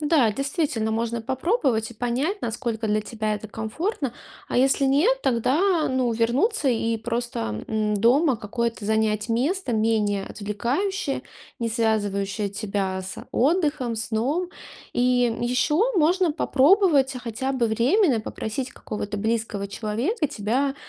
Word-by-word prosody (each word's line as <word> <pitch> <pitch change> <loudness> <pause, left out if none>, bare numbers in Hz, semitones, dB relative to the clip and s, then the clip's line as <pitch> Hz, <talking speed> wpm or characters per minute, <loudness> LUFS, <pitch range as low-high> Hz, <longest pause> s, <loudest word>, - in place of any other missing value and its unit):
Да, 290 -8 +3
действительно, 275 - -1
можно 230 +1 -1
попробовать 265 - 0
и 235 - -11
понять, 260 - -1
насколько 225 -1 -2
для 210 +1 +2
тебя 215 0 -2
это 220 - -6
комфортно, 245 - -3 0.4
а - - -2
если 270 +2 +3
нет, 380 - +3
тогда, 305 - +2
а, - - 0
ну, 255 -2 +1
вернуться 270 - +1
и 230 -1 +1
просто, 230 - -3
м, 215 -1 0
дома 250 +6 +3
какое-то 230 0 -3
занять 215 0 +1
место 265 +6 0
менее 215 -3 +1
отвлекающее, 270 - -2 0.4
не 230 -1 -1
связывающее 210 -3 0
тебя 195 -2 -2
с, 185 - -7
а, - - -10
отдыхом, 285 -4 +1
сном. 240 +11 -1 0.4
И, 245 0 +3
м, 225 - -5
еще 250 +7 +1 0.2
можно 345 +1 +3
попробовать 290 -2 +4
хотя 245 +3 -3
бы 250 -3 +1
временно 245 - +3
попросить 220 +4 -4
какого-то 210 -1 -5
близкого 220 -2 -1
человека 235 - -1
тебя 265 +2 -1
235 Hz, 135 wpm, -24 LUFS, 220-280 Hz, 0.4 s, попробовать